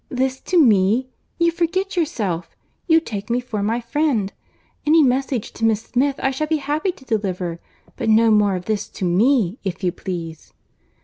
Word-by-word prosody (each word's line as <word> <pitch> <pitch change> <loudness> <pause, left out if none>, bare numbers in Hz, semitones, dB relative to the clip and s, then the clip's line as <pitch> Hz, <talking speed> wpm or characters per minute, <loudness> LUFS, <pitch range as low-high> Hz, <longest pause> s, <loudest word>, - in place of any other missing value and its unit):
This 260 +1 -1
to 365 - +1
me! 225 - +4 0.3
you 340 -1 +3
forget 370 +4 -1
yourself—you 235 - -1
take 205 -8 -6
me 240 +1 +1
for 240 -4 -4
my 225 +4 0
friend—any 295 +4 0
message 260 -3 0
to - - -8
Miss 220 -1 +2
Smith 265 +4 0
I 270 - 0
shall 305 +4 -2
be 315 0 +1
happy 300 +5 -1
to 275 -7 -19
deliver; 185 -7 -2 0.4
but - - -1
no 225 +1 +5
more 205 -2 +3
of 180 0 -5
this 215 -2 -2
to 185 - -5
me, 210 +3 +2
if 190 -1 -4
you 180 - +2
please." 165 -4 -7
235 Hz, 170 wpm, -21 LUFS, 200-285 Hz, 0.4 s, no